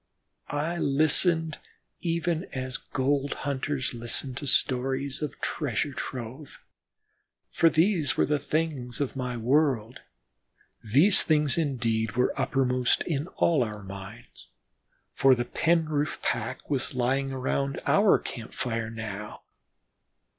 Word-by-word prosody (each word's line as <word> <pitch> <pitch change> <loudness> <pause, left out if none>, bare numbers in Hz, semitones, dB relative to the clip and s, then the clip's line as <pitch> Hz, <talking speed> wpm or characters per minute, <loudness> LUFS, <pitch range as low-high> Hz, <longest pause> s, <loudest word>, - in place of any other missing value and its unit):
I 155 +4 -2
listened 155 +2 +3 0.4
even 170 0 -1
as 130 -1 -4
gold 140 +1 -1
hunters 140 -1 -1
listen 120 +3 -1
to 140 +3 -6
stories 135 +2 0
of 150 - -4
treasure 145 -1 -1
trove, 130 +3 -7 0.9
for 165 - +4
these 160 -3 +2
were - - +4
the 150 -1 +1
things 150 -7 -2
of 140 -2 -2
my 125 -2 -3
world. 125 -2 +1 0.8
These 145 - +5
things 150 -3 +2
indeed 115 -8 0
were 125 +1 +1
uppermost 130 -2 +1
in 155 -1 -2
all 165 -5 +3
our 105 -3 -6
minds, 100 - -10 0.7
for 135 -1 +5
the 120 0 -2
Penroof 155 0 0
pack 120 +2 -2
was 135 -3 -2
lying 135 +2 0
around 135 +1 -1
our 200 0 +5
camp 115 -3 -8
fire 115 -3 -2
now. 105 -2 -7
135 Hz, 120 wpm, -27 LUFS, 120-150 Hz, 0.9 s, These